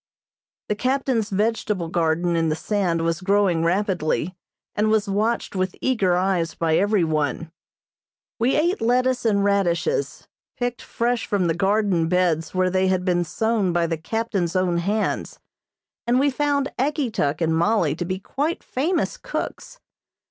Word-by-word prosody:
The - - +1
captain's 255 -1 0
vegetable 210 -3 -1
garden 170 +1 0
in 165 -1 +1
the 155 - 0
sand 175 -2 -1
was 165 0 -1
growing 190 -3 +2
rapidly, 180 -1 0 0.4
and 215 +1 +1
was 215 -1 +2
watched 210 +3 -1
with 185 -1 -1
eager 200 -9 +1
eyes 180 -3 0
by 160 -1 +1
everyone. 165 -6 0 0.9
We 240 +4 +2
ate 345 +6 +1
lettuce 250 +2 +1
and 200 -3 +2
radishes, 200 - 0 0.3
picked 245 -1 -2
fresh 240 0 -1
from 200 -3 +1
the 165 - +2
garden 195 -2 +1
beds 175 -2 +1
where 185 0 +2
they 190 0 +2
had 185 -1 0
been 175 -2 +2
sown 220 +2 0
by 170 0 +2
the 165 0 -1
captain's 195 0 -2
own 180 -2 +1
hands, 205 +5 -1 0.7
and 245 +2 +3
we 285 +1 +3
found 285 0 0
Ageetuk 245 - 0
and 160 -1 +1
Mollie 170 -3 +2
to 175 - -2
be 185 +2 -3
quite 290 - -3
famous 325 +8 -1
cooks. - - -6
195 Hz, 150 wpm, -23 LUFS, 170-230 Hz, 0.9 s, and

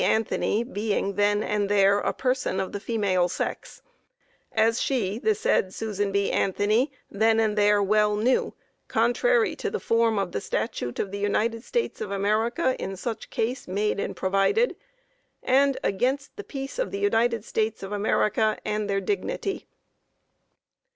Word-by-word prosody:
Anthony 220 0 +1
being 210 -4 -2
then 205 +1 +2
and 205 -1 -1
there 200 0 +4
a - - 0
person 255 -7 -1
of 190 - -2
the 205 - -4
female 195 -5 +1
sex,) - - -5 0.7
as 225 +1 +2
she, 220 -6 -1
the 215 -3 +2
said 190 -2 +1
Susan 205 -2 -2
B. 200 0 +1
Anthony 210 +8 +1 0.2
then 220 +2 +3
and 215 -2 +1
there 205 -1 +4
well 210 +1 +3
knew, 235 +5 +1 0.3
contrary 435 - +2
to - - -2
the 445 - -3
form 230 -1 +2
of 195 -3 -1
the - - -3
statute 125 - -3
of 195 - -2
the 200 - -4
United 225 +3 0
States 475 - -2
of - - -3
America 215 +6 +1
in 195 0 -4
such 225 +2 -5
case 245 +4 -2
made 200 +2 -1
and - - -3
provided, 195 - +2 0.7
and 275 +1 +3
against 260 +8 -1
the 415 - -7
peace 275 - -6
of - - 0
the 400 - -4
United 235 - +1
States 220 -2 -1
of 195 - -6
America 215 +1 +1
and 210 -1 -2
their 195 0 0
dignity. 405 - -3
215 Hz, 160 wpm, -26 LUFS, 200-240 Hz, 0.7 s, there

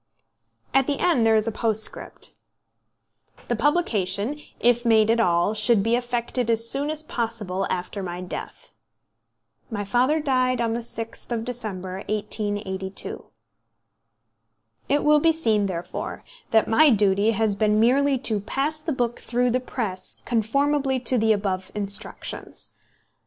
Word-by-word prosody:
At 270 0 +3
the 285 -2 0
end 275 -11 +2
there 220 - +4
is 215 +1 +2
a - - 0
postscript: 220 -1 -2 1.2
"The 240 - +1
publication, 230 - 0 0.2
if 240 0 +3
made 220 -2 +4
at 230 - +2
all, 175 -1 +2
should 215 -1 +4
be 230 +2 +2
effected 245 0 -2
as 230 0 +4
soon 280 +5 0
as 310 0 -3
possible 220 -8 -3
after 185 +2 -3
my 175 -1 -5
death." 180 0 -7 1.0
My 205 -3 -4
father 255 +9 +2
died 255 -4 +1
on 230 -1 0
the 235 - -1
6th 230 0 -7
of 225 -1 -2
December, 195 -7 -5
1882. 205 -2 -2 1.6
It 285 +1 +2
will 300 0 +5
be 325 +2 +4
seen, 220 -11 +1
therefore, 175 -2 -5 0.3
that 220 -1 +3
my 300 +7 +5
duty 205 -2 +3
has 215 -1 +1
been 210 0 +2
merely 270 +4 +3
to 225 -5 0
pass 285 +9 -2
the 310 0 -2
book 240 -2 -2
through 245 +1 0
the 255 - +1
press 215 -7 -4
conformably 270 +4 +1
to 250 0 +4
the 220 0 +3
above 190 -3 -1
instructions. 200 -1 -4
230 Hz, 140 wpm, -24 LUFS, 205-255 Hz, 1.6 s, will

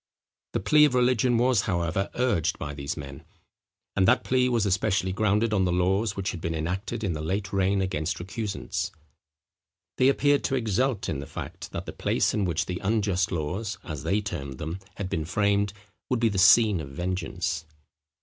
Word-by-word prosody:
The - - +1
plea 150 0 +5
of 135 -4 +1
religion 125 -1 +3
was, 120 -3 +3
however, 90 +1 0
urged 120 -11 +1
by 75 0 -5
these 70 +1 -4
men: 70 -2 -8 0.7
and 95 -1 +3
that 125 +4 +4
plea 125 0 +2
was 115 -4 +1
especially 95 -1 +1
grounded 105 +2 +1
on 95 -2 +3
the 90 - +1
laws 95 +4 +1
which 95 -1 -2
had 85 - -7
been 80 0 -2
enacted 95 +8 -3
in 95 -5 0
the 75 - -4
late 95 +5 -2
reign 95 0 +2
against 90 -3 -2
recusants. 100 +2 -3 1.1
They 130 - +6
appeared 145 +1 +3
to 135 - +1
exult 120 -1 0
in 75 - -2
the 70 - -7
fact, - - -7
that - - -5
the - - -7
place - - +1
in 105 -2 +1
which 85 -3 0
the 90 -1 -4
unjust 100 -4 +1
laws, 95 +6 -3
as 75 -5 -6
they 105 +2 +1
termed 70 -9 -5
them, 80 +6 -5 0.2
had 100 - -4
been 80 -3 -2
framed, 100 +3 +1 0.4
would 125 - +1
be 115 -1 +3
the 100 -2 -1
scene 100 0 +6
of 70 - -8
vengeance. 85 +1 -3
95 Hz, 190 wpm, -26 LUFS, 85-110 Hz, 1.1 s, They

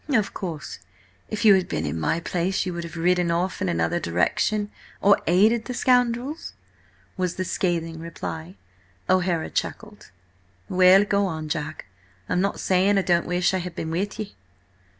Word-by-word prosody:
"Of 220 -8 +1
course, 165 -6 -6 0.5
if 215 +1 -3
you 210 - +9
had 190 -2 +2
been - - -2
in 75 +3 -3
my 120 - 0
place 180 +3 -1
you 180 - -3
would 170 0 -4
have 170 0 -9
ridden 180 +1 +2
off 175 +3 -1
in 95 - 0
another 85 -1 0
direction–or 200 - 0
aided 215 +7 +4
the 250 - -5
scoundrels?" 250 +4 +1 0.6
was 180 -2 -1
the 185 - -2
scathing 165 -3 -1
reply. 90 - -6 0.5
O'Hara 180 -3 +1
chuckled. 210 -1 -5 0.6
"Well, 185 - +6
go 200 -1 +1
on, 160 -3 -5
Jack. 155 +1 -4 0.4
I'm 180 - +1
not 200 +1 -1
saying 190 +2 +2
I 195 - +2
don't 170 -2 +2
wish 180 +1 +1
I 185 - +1
had 180 -1 -6
been 160 - -4
with 195 +5 -2
ye." 215 -2 -6
180 Hz, 165 wpm, -24 LUFS, 165-200 Hz, 0.6 s, you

